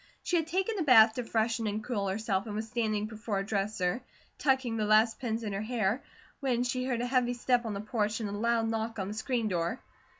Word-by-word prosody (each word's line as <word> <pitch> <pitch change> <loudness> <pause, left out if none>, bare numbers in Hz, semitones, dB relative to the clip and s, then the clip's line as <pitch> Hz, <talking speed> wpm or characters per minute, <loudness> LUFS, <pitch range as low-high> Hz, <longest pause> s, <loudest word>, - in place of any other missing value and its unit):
She 355 - 0
had 325 -2 0
taken 380 +5 -1
a - - +1
bath 225 -7 +7
to 250 - -3
freshen 225 0 0
and 210 +1 -2
cool 210 -5 -2
herself 195 0 -1
and 210 - -4
was 215 +1 -2
standing 215 -2 -1
before 215 -1 -4
her 195 - 0
dresser, 200 0 -1 0.4
tucking 265 -4 +1
the 215 -1 0
last 215 +2 +4
pins 230 -2 -2
in 210 -2 -3
her 195 - -2
hair, 220 +1 0 0.4
when 250 -4 +1
she 255 0 -1
heard 245 -3 -1
a - - -1
heavy 245 -1 +1
step 245 -1 +1
on 210 - -3
the 200 - -3
porch 215 0 -1
and 220 - -2
a - - -5
loud 225 +2 +1
knock 225 0 -2
on 195 -1 -3
the - - -4
screen 230 +1 -1
door. 175 +4 -1
225 Hz, 235 wpm, -30 LUFS, 210-245 Hz, 0.4 s, bath